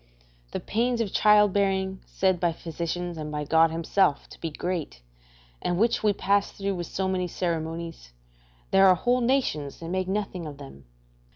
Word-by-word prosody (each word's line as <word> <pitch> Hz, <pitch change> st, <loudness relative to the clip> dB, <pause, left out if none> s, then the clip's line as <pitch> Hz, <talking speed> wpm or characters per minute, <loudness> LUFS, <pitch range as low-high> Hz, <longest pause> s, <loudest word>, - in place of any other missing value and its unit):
The -, -, -3 dB
pains 240 Hz, +2 st, 0 dB
of 220 Hz, -4 st, -2 dB
childbearing, 195 Hz, -2 st, +3 dB
said 190 Hz, -2 st, +1 dB
by 170 Hz, -1 st, +1 dB
the -, -, -20 dB
physicians 170 Hz, +1 st, -4 dB
and 150 Hz, 0 st, -5 dB
by 150 Hz, 0 st, -2 dB
God 160 Hz, +2 st, +4 dB
himself 165 Hz, -1 st, +1 dB
to -, -, -14 dB
be 165 Hz, -, -2 dB
great, 155 Hz, -, -4 dB, 0.6 s
and 175 Hz, -, -1 dB
which 230 Hz, +4 st, +2 dB
we 210 Hz, -, +3 dB
pass 200 Hz, 0 st, +1 dB
through 200 Hz, 0 st, -3 dB
with 175 Hz, -2 st, -4 dB
so 190 Hz, 0 st, -2 dB
many 185 Hz, -1 st, -1 dB
ceremonies 165 Hz, -, -4 dB, 0.6 s
there 195 Hz, 0 st, +6 dB
are 185 Hz, -, +7 dB
whole 245 Hz, +7 st, +1 dB
nations 235 Hz, -, 0 dB
that 165 Hz, -, -7 dB
make 185 Hz, +1 st, -1 dB
nothing 190 Hz, -4 st, -3 dB
of 145 Hz, -2 st, -8 dB
them. 135 Hz, -, -12 dB
180 Hz, 175 wpm, -26 LUFS, 165-200 Hz, 0.6 s, are